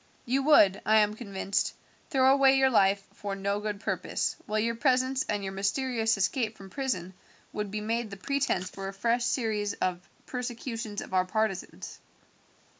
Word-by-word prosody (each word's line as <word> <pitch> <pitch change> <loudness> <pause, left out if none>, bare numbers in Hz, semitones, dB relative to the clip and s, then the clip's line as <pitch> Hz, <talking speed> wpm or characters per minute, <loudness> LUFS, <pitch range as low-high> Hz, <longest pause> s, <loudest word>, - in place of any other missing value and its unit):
You 260 +3 +1
would, 210 -10 +5
I 215 - +3
am 210 -1 +4
convinced, 200 -3 -2 0.3
throw 265 -3 +5
away 270 -1 +5
your 265 0 +4
life 195 -3 +3
for 200 -1 -5
no 200 +1 -1
good 210 -1 -4
purpose, - - -1
while 215 - -1
your 230 +2 +1
presence 260 +1 +1
and 205 -1 -1
your 190 0 -4
mysterious 225 +3 0
escape 215 +3 0
from 195 -1 -12
prison 210 -10 -3 0.4
would 210 -1 -3
be 210 +1 -4
made 225 +1 -1
the 200 - -8
pretense 275 -4 -1
for 195 +1 -7
a 195 - -5
fresh 235 +4 +1
series 220 -4 0
of 180 -1 -2 0.2
persecutions 235 -4 -4
of - - -10
our 185 0 +3
partisans. 210 -1 -3
215 Hz, 170 wpm, -28 LUFS, 195-250 Hz, 0.4 s, would